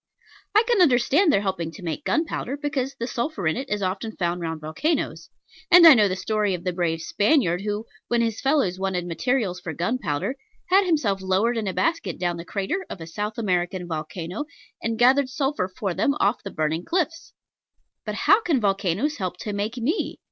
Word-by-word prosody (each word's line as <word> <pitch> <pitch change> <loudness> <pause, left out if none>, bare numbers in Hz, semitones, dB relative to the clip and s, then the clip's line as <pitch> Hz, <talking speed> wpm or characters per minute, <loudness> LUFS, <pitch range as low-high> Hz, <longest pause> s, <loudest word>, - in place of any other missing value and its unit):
I 430 - +7
can 465 -4 +3
understand 290 +4 +4
their 200 - +3
helping 185 -4 -2
to 190 - -11
make 170 - -4
gunpowder, 310 -4 -1
because 275 -2 -2
the 235 - -4
sulphur 235 - -3
in 160 - +2
it 265 +2 -5
is 210 -1 -1
often 195 +4 -3
found 175 0 -1
round 165 -1 -3
volcanos; 275 - -2 0.4
and 350 -1 +9
I 325 - +12
know 215 -5 +4
the 185 - -1
story 210 0 0
of 170 - -8
the 180 - -1
brave 165 -2 -1
Spaniard 200 - +2
who, 210 +1 -3 0.2
when 240 -1 +1
his 225 -2 -1
fellows 270 -10 +1
wanted 190 -2 -1
materials 185 - -1
for 170 -2 -6
gunpowder, 175 - -2 0.3
had 385 0 +5
himself 225 - +1
lowered 190 +6 +1
in 220 -3 -2
a 190 - -1
basket 325 - 0
down 175 -1 -1
the 170 - -7
crater 200 - -2
of - - -7
a 165 - -7
South 210 +6 -4
American 180 -4 -1
volcano, 165 - -5 0.4
and 230 -1 -2
gathered 255 +3 +4
sulphur 270 -7 -1
for 190 0 -4
them 280 +10 +1
off 205 +4 +2
the 200 - -6
burning 160 0 -1
cliffs: 330 - -2 0.7
but - - -4
how 405 +3 +4
can 325 - +1
volcanos 200 - 0
help 185 -2 -3
to 210 - -5
make 210 +4 -3
me? 275 - -1
210 Hz, 195 wpm, -24 LUFS, 180-270 Hz, 0.7 s, I